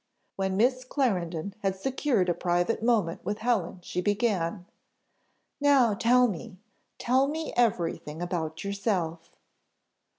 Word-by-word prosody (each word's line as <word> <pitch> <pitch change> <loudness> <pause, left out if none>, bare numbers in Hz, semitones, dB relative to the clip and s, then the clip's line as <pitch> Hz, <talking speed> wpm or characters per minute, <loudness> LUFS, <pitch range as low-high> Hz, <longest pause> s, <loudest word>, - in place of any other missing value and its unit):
When 190 -1 -1
Miss 255 +4 +2
Clarendon 195 - -1
had 195 -2 -1
secured 250 -2 0
a 175 - +2
private 175 +6 0
moment 220 -8 +1
with 205 +3 -2
Helen, 220 -7 -1
she 180 - -3
began. 200 -3 0 0.9
"Now 275 -6 +4
tell 245 +4 +4
me 205 0 -6 0.4
tell 260 +3 +2
me 315 +2 -4
everything 170 -9 0
about 165 -3 -3
yourself." 195 -5 -2
200 Hz, 120 wpm, -28 LUFS, 175-245 Hz, 0.9 s, Now